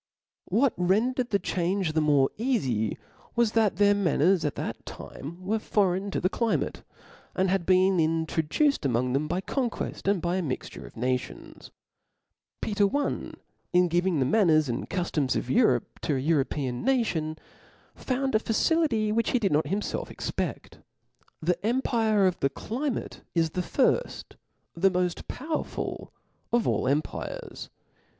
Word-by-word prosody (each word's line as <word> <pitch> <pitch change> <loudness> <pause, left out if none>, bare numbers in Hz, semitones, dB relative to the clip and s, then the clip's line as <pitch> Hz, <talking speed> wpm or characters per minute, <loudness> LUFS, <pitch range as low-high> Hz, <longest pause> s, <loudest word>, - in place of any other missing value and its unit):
What 260 +2 +2
rendered 235 +8 +1
the 200 - +3
change 180 -2 -1
the 160 - +2
more 145 -3 +3
eafy 135 - 0 0.4
was, 235 -2 +3
that 220 -5 +2
their 205 +2 +5
manners 180 -2 +2
at 150 - -1
that - - -5
time 170 +6 -9
were 220 +3 0
foreign 195 -2 +1
to - - -2
the 185 - +2
climate; 230 +3 -1 0.5
and 185 0 +1
had 190 -3 0
been 185 0 +4
introduced 160 - +1
amongft 125 -1 0
them 145 +3 0
by 180 +4 -1
conqucft, 240 -3 -3
and 200 -1 +3
by 175 +2 -1
a - - 0
mixture 140 -7 -5
of - - -16
pations. 125 +2 -4 0.9
Peter 205 -1 +2
I. 290 - -2 0.4
HI 180 0 +5
giving 175 0 +1
the 130 - +2
manners 155 -2 +4
and 120 0 -3
cuiloms 155 -8 0
of 125 - -2
Europe 220 - +2
to 150 - -1
an 130 - -1
European 140 -4 0
nation, 195 -12 0 0.6
found 265 +1 -2
a 215 - +4
facility 225 -2 +1
which 230 +2 +1
he - - +2
did 205 -7 0
not 150 +2 +2
himfelf 205 +2 -2
cxpedl. - - -4 0.6
The 180 +4 0
empire 225 -3 +2
of 185 -2 +1
the 135 - +2
climate' 255 - -4
is 165 -2 +2
the 180 - -1
firft, 275 - 0 0.4
the 190 +3 +3
moft 180 -1 -1
powerful 310 +4 -4 0.4
of 240 -1 +2
all - - +1
empires. 145 +3 -3
185 Hz, 150 wpm, -27 LUFS, 155-225 Hz, 0.9 s, their